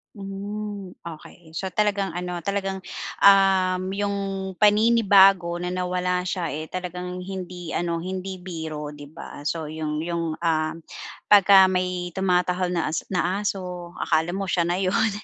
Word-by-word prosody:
Hmm, 200 0 -6
okey. 160 0 -11
So, 190 0 -3
talagang 200 0 +1
ano, 180 0 -4
talagang, 195 -1 -2 0.4
um, 190 -2 +5
yung 200 0 -1 0.4
paninibago 200 -5 +5
na 180 +1 -3
nawala 180 0 -1
siya 180 -4 -3
eh 155 +2 -5
talagang 180 0 -5
hindi 180 -2 -6
ano, 170 -1 -1
hindi 185 +2 -4
biro, 160 -4 -6
'di 145 -1 -11
ba? 155 -2 -10
So, 165 -2 -2
yung 155 0 -3
yung, 170 -2 -2
um, 160 -2 0 0.6
pagka 195 -1 +8
may 180 -1 -1
tumatahol 180 -1 +1
na 160 -2 -1
as - - 0
na 185 +1 0
aso, 180 -3 -4
akala 165 +3 0
mo 195 - -2
siya 175 -2 0
na 175 - +1
yun, 190 +3 +1
180 Hz, 140 wpm, -24 LUFS, 170-195 Hz, 0.6 s, pagka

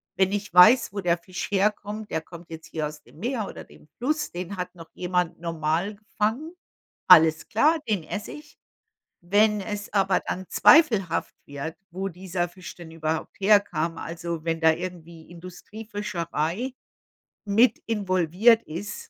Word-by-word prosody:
Wenn 190 0 +2
ich 205 -2 -4
weiß, 215 +5 +7
wo 205 - -4
der 175 -1 +2
Fisch 185 +2 -6
herkommt, 210 +1 -1
der 160 - -1
kommt 170 +1 -13
jetzt 160 0 -9
hier 155 -2 -3
aus 150 0 -11
dem - - -20
Meer 230 0 -2
oder - - -9
dem - - -19
Fluss, 300 +5 -1
den 180 +3 -6
hat 180 +1 -5
noch 165 -2 -12
jemand 180 -2 -1
normal 165 +4 -2
gefangen: 220 - -3 0.5
Alles 160 -3 +7
klar, 305 +9 +3
den 200 -6 0
esse 210 +5 -6
ich. 300 0 -13 0.7
Wenn 210 +3 +3
es 205 +1 -6
aber 195 -2 +2
dann 185 +1 -5
zweifelhaft 225 - +4
wird, 145 +3 -6
wo 190 +3 -4
dieser 180 -1 -3
Fisch 180 +1 -11
denn 170 -2 -11
überhaupt 160 0 -3
herkam, 195 -5 +2
also, 165 -1 -5
wenn 165 0 -1
da 160 0 +5
irgendwie 170 -2 -8
Industriefischerei 185 - -5 0.7
mit 220 +5 +3
involviert 200 +2 +3
ist, 200 +7 -7
185 Hz, 150 wpm, -25 LUFS, 165-210 Hz, 0.7 s, weiß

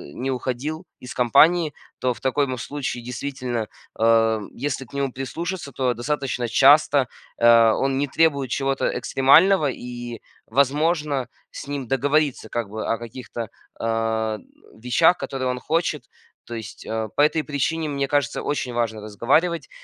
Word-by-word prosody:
не 135 +2 -2
уходил 130 +6 -3 0.2
из 125 - -8
компании. 150 +6 +4 0.3
То 125 -1 +1
в - - -15
таком 135 -1 0
случае, 130 0 -4
действительно, 125 -2 -4 0.3
ам, 115 -2 +3
если 135 0 -3
к 120 - -22
нему 140 -1 -1
прислушаться, 165 +5 -5
то 125 -1 0
достаточно 125 0 -2
часто, 140 +3 +5 0.3
а, 115 -1 +6
он 135 0 0
не 145 +1 0
требует 140 -2 +2
чего-то 135 0 0
экстремального, 155 +4 +4
и 120 -1 -7 0.3
возможно 145 +2 +1 0.2
с - - -8
ним 140 -3 -4
договориться 140 +2 +1
как 115 -4 -3
бы 110 +1 -5
о 115 - 0
каких-то, 120 0 -7 0.3
а, 115 -1 0
н - - -18 0.3
вещах, 145 +9 +4
которые 130 -1 -3
он 125 0 -1
хочет. 165 +5 -1 0.4
То 120 - -8
есть, 110 -1 -8
а, 110 0 -2
по - - +3
этой 155 +1 +3
причине, 155 +2 -1
мне 140 -1 -1
кажется, 145 -3 0
очень 135 -4 -2
важно 115 -2 -1
разговаривать, 140 - 0
130 Hz, 150 wpm, -23 LUFS, 120-145 Hz, 0.4 s, а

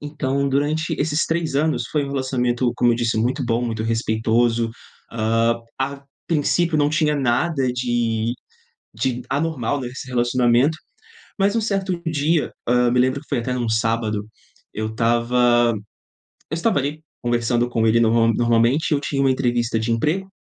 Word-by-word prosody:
Então, 140 -2 -2
durante 150 +4 0
esses 150 +1 +1
3 165 -3 -1
anos 150 -5 +1
foi 150 -2 0
um 140 - -6
relacionamento, 125 -2 0
como 120 -1 +3
eu - - 0
disse, 115 -1 0
muito 120 +4 0
bom, 115 0 0
muito 110 -2 -3
respeitoso. 115 +1 +1 0.4
Hã, 115 +1 +1 0.2
a 140 +1 -2 0.3
princípio, 165 +1 +1
não 145 - +3
tinha 155 -1 +1
nada 135 +1 +1
de 120 -2 -1 0.6
de 125 +2 -2
anormal 145 -2 -1
nesse 125 +1 -7
relacionamento, 125 +4 +2 0.6
mas 200 +1 +2
um 230 - +3
certo 195 -4 -1
dia, 155 +1 +1 0.2
hã, 125 0 +3
me 125 - +1
lembro 130 +2 +2
que 150 - -21
foi - - -1
até 125 +2 -2
num 120 -2 -2
sábado, 110 -1 0 0.5
eu 110 +1 -3
estava 120 +1 +2 0.8
eu 160 - -2
estava 170 0 +1
ali 145 +3 -3 0.2
conversando 120 0 0
com 115 -2 0
ele 110 +1 +4
normal 115 0 +3
normalmente, 120 +7 +2
e - - +5
eu - - 0
tinha 140 -1 -1
uma 135 - +3
entrevista 120 -3 0
de 110 +1 -1
emprego. 155 +12 0
125 Hz, 160 wpm, -21 LUFS, 115-145 Hz, 0.8 s, e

